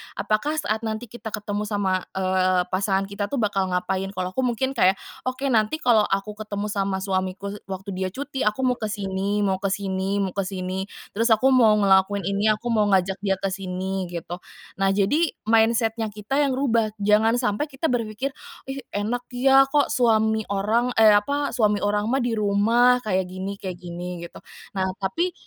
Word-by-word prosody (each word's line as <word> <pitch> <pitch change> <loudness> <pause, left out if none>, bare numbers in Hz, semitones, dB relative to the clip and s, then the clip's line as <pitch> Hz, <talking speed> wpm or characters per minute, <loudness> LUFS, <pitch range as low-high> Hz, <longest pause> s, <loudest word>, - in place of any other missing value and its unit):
Apakah, 215 +9 0
saat 220 -8 -1
nanti 220 +1 -4
kita 240 -1 -8
ketemu 205 0 -3
sama, 195 -3 0
eee, 185 -1 +2
pasangan 195 +1 +1
kita 200 0 -3
tuh 240 - -3
bakal 200 -3 0
ngapain? 190 +1 -1
Kalau 185 0 -2
aku, 260 +7 -1
mungkin 255 +3 -1
kayak, 195 -7 +3 0.3
"Oke, 260 +1 -1
nanti 220 +3 +2
kalau 225 -4 +4
aku 205 +2 -3
ketemu 210 -1 -4
sama 195 -2 -1
suamiku 190 0 -2 0.2
waktu 195 +1 -6
dia 185 0 -2
cuti, 275 -2 -3
aku 215 +5 0
mau 250 -1 +2
ke 215 - -2
sini 200 0 -2
mau 190 -2 0
ke 200 - -1
sini 195 0 -1
mau 190 - -2
ke 195 +1 -2
sini, 185 0 -4 0.2
terus 230 +2 +3
aku 260 +5 +3
mau 230 -5 +6
ngelakuin 195 -1 +3
ini, 200 +3 0
aku 235 +3 -4
mau 215 -2 +3
ngajak 190 -1 +1
dia 195 -1 0
ke 190 +1 -3
sini," 190 0 -3
gitu. 175 0 -6 0.4
Nah, 195 - +3
jadi 290 +12 +1
mindset-nya 225 0 +2
kita 210 +6 -3
yang 280 -3 +2
rubah, 230 -5 +1
jangan 215 +3 +4
sampai 245 +3 0
kita 280 +1 -2
berpikir, 235 +2 -2 0.4
"Ih 275 - -5 0.2
enak 225 +4 -2
ya, 270 +2 +5
kok 285 0 +2
suami 220 -2 +2
orang, 220 +5 0
e 220 -1 +7
apa, 280 +8 +1
suami 210 -4 +1
orang 205 +1 +1
mah, 265 +2 +1
di 245 - 0
rumah 230 +5 +4
kayak 190 -3 0
gini 190 +2 -4
kayak 185 -3 -6
gini," 175 0 -6
gitu. - - -15 0.4
Nah, 190 - +1 0.2
tapi 335 - -1
210 Hz, 185 wpm, -24 LUFS, 190-235 Hz, 0.4 s, e